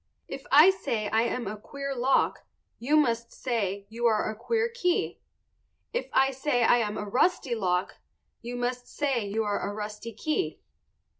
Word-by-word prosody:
If 270 Hz, -, -8 dB
I 305 Hz, +7 st, +9 dB
say 230 Hz, -, -2 dB
I 220 Hz, -, +3 dB
am 240 Hz, 0 st, -2 dB
a 210 Hz, -, -4 dB
queer 275 Hz, +6 st, -6 dB
lock 260 Hz, +2 st, +2 dB, 0.4 s
you 285 Hz, +6 st, +2 dB
must 235 Hz, -5 st, +1 dB
say 200 Hz, -6 st, -2 dB
you 235 Hz, +3 st, 0 dB
are 215 Hz, -1 st, +1 dB
a -, -, -8 dB
queer 450 Hz, -, 0 dB
key. 460 Hz, -7 st, -1 dB, 0.7 s
If -, -, -2 dB
I 270 Hz, 0 st, +4 dB
say 265 Hz, -2 st, 0 dB
I 240 Hz, -, +5 dB
am 215 Hz, -3 st, -1 dB
a 210 Hz, -, -3 dB
rusty 260 Hz, -, +1 dB
lock 185 Hz, -5 st, -1 dB, 0.4 s
you 240 Hz, +1 st, -6 dB
must 245 Hz, 0 st, -3 dB
say 270 Hz, -6 st, -1 dB
you 220 Hz, +2 st, -1 dB
are 205 Hz, -1 st, -1 dB
a 200 Hz, -, -3 dB
rusty 210 Hz, +2 st, -6 dB
key. 310 Hz, -, -2 dB
240 Hz, 170 wpm, -28 LUFS, 215-275 Hz, 0.7 s, I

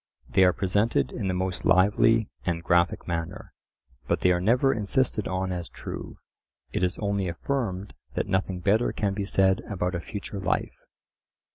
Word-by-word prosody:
They 95 Hz, -, +4 dB
are 90 Hz, -, +5 dB
presented 100 Hz, +5 st, +1 dB
in 105 Hz, -5 st, -3 dB
the 95 Hz, -, 0 dB
most 90 Hz, 0 st, -2 dB
lively 105 Hz, +4 st, +4 dB, 0.2 s
and 85 Hz, -2 st, -2 dB
graphic 85 Hz, 0 st, +2 dB
manner, 85 Hz, +1 st, -4 dB, 0.5 s
but -, -, 0 dB
they 90 Hz, -, +4 dB
are 90 Hz, 0 st, +1 dB
never 125 Hz, +7 st, +3 dB
insisted 110 Hz, 0 st, 0 dB
on 95 Hz, 0 st, -2 dB
as 90 Hz, -2 st, -4 dB
true; -, -, -7 dB, 0.5 s
it -, -, -2 dB
is 90 Hz, +1 st, 0 dB
only 100 Hz, -2 st, -1 dB
affirmed 100 Hz, 0 st, -3 dB, 0.2 s
that -, -, 0 dB
nothing 95 Hz, -1 st, -1 dB
better 105 Hz, +6 st, +2 dB
can 100 Hz, -3 st, -1 dB
be 100 Hz, 0 st, -2 dB
said 95 Hz, -1 st, +3 dB
about 90 Hz, -3 st, -1 dB
a 90 Hz, -, -1 dB
future 100 Hz, +2 st, -6 dB
life. 95 Hz, -, -1 dB
95 Hz, 165 wpm, -26 LUFS, 90-105 Hz, 0.5 s, are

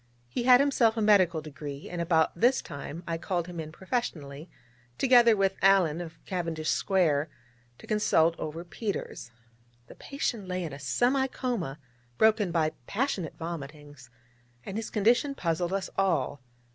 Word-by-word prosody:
He 235 Hz, -, -3 dB
had 250 Hz, -1 st, +8 dB
himself 250 Hz, -5 st, +3 dB
a -, -, +1 dB
medical 185 Hz, -6 st, +4 dB
degree, 145 Hz, -1 st, -8 dB
and 175 Hz, -1 st, -4 dB
about 165 Hz, -2 st, +2 dB
this 245 Hz, +9 st, +3 dB
time 145 Hz, +4 st, -7 dB
I 165 Hz, -1 st, -2 dB
called 175 Hz, -1 st, -2 dB
him 175 Hz, -1 st, -8 dB
in 155 Hz, -1 st, -6 dB
professionally, 160 Hz, -, -4 dB, 0.5 s
together 240 Hz, -4 st, +5 dB
with 195 Hz, 0 st, +1 dB
Alleyne 180 Hz, -5 st, +4 dB
of 165 Hz, -1 st, -10 dB
Cavendish 165 Hz, -4 st, -2 dB
Square, 160 Hz, -6 st, +1 dB, 0.5 s
to -, -, -14 dB
consultation 170 Hz, -6 st, +2 dB
over 160 Hz, +2 st, -5 dB
Peters. 180 Hz, -, -5 dB, 0.6 s
The -, -, -13 dB
patient 240 Hz, -7 st, -4 dB
lay 180 Hz, 0 st, -2 dB
in 155 Hz, -4 st, -5 dB
a 140 Hz, -, -8 dB
semi 245 Hz, -, +1 dB
coma 230 Hz, -, -3 dB, 0.4 s
broken 220 Hz, -4 st, +3 dB
by 160 Hz, -2 st, +1 dB, 0.2 s
passionate 205 Hz, -, -2 dB
vomitings, 145 Hz, -4 st, -8 dB, 0.6 s
and 195 Hz, -, -6 dB
his 220 Hz, 0 st, -3 dB
condition 240 Hz, +7 st, +2 dB
puzzled 170 Hz, -3 st, -1 dB
us 195 Hz, 0 st, -1 dB
all. 175 Hz, -7 st, 0 dB
175 Hz, 150 wpm, -28 LUFS, 155-215 Hz, 0.6 s, had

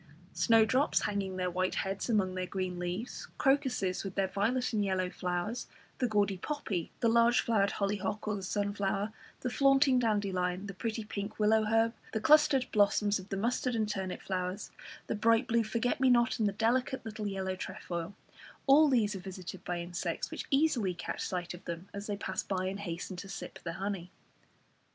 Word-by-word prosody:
Snowdrops 225 Hz, -, +4 dB
hanging 200 Hz, -2 st, -2 dB
their 180 Hz, -1 st, -1 dB
white 185 Hz, +1 st, 0 dB
heads 195 Hz, +4 st, -2 dB
among 195 Hz, -5 st, +2 dB
their 185 Hz, 0 st, -3 dB
green 185 Hz, -2 st, -3 dB
leaves, 180 Hz, +7 st, -4 dB
crocuses 255 Hz, -9 st, +1 dB
with 195 Hz, -1 st, -6 dB
their 195 Hz, -1 st, +2 dB
violet 245 Hz, +6 st, 0 dB
and 210 Hz, -2 st, +2 dB
yellow 185 Hz, -2 st, 0 dB
flowers, 180 Hz, +6 st, -3 dB, 0.3 s
the 250 Hz, -, +2 dB
gaudy 205 Hz, -3 st, +1 dB
poppy, 195 Hz, -, -3 dB
the 235 Hz, -, +4 dB
large 235 Hz, +1 st, +5 dB
flowered 200 Hz, -4 st, +2 dB
hollyhock 205 Hz, +1 st, -2 dB
or 215 Hz, -, +1 dB
the 200 Hz, -, -5 dB
sunflower, 200 Hz, +1 st, -1 dB, 0.3 s
the 250 Hz, -, -1 dB
flaunting 275 Hz, -1 st, +4 dB
dandelion, 195 Hz, -5 st, 0 dB
the 195 Hz, -, -6 dB
pretty 225 Hz, +3 st, -3 dB
pink 205 Hz, 0 st, -5 dB
willow 215 Hz, +1 st, +4 dB
herb, 225 Hz, +1 st, +3 dB, 0.2 s
the 220 Hz, -, 0 dB
clustered 280 Hz, +1 st, +5 dB
blossoms 205 Hz, -1 st, +3 dB
of 190 Hz, +1 st, -11 dB
the 195 Hz, -, -2 dB
mustard 245 Hz, +3 st, 0 dB
and 220 Hz, -2 st, +1 dB
turnip 190 Hz, -3 st, -3 dB
flowers, 185 Hz, +1 st, -3 dB, 0.3 s
the -, -, -2 dB
bright 230 Hz, +3 st, +3 dB
blue 235 Hz, 0 st, +2 dB
forget 230 Hz, +4 st, -1 dB
me 265 Hz, -1 st, +4 dB
not 240 Hz, 0 st, +3 dB
and 215 Hz, -, +3 dB
the 200 Hz, -, -1 dB
delicate 250 Hz, +5 st, 0 dB
little 215 Hz, -1 st, -4 dB
yellow 190 Hz, -1 st, -2 dB
trefoil, 175 Hz, 0 st, -5 dB, 0.5 s
all 290 Hz, +2 st, +7 dB
these 225 Hz, -6 st, +2 dB
are -, -, -4 dB
visited 185 Hz, -1 st, -8 dB
by 175 Hz, -1 st, -2 dB
insects, 170 Hz, 0 st, -3 dB
which -, -, -5 dB
easily 270 Hz, -, +2 dB
catch -, -, -5 dB
sight 180 Hz, -2 st, -3 dB
of 175 Hz, -, -11 dB
them 170 Hz, +2 st, -5 dB
as 200 Hz, +1 st, -6 dB
they 205 Hz, -1 st, -2 dB
pass -, -, -2 dB
by 185 Hz, -2 st, -2 dB
and 195 Hz, +2 st, -3 dB
hasten 180 Hz, -1 st, -5 dB
to 195 Hz, +2 st, -8 dB
sip 195 Hz, -, -7 dB
their 170 Hz, -, -4 dB
honey. 195 Hz, -3 st, -3 dB
205 Hz, 185 wpm, -31 LUFS, 185-230 Hz, 0.5 s, all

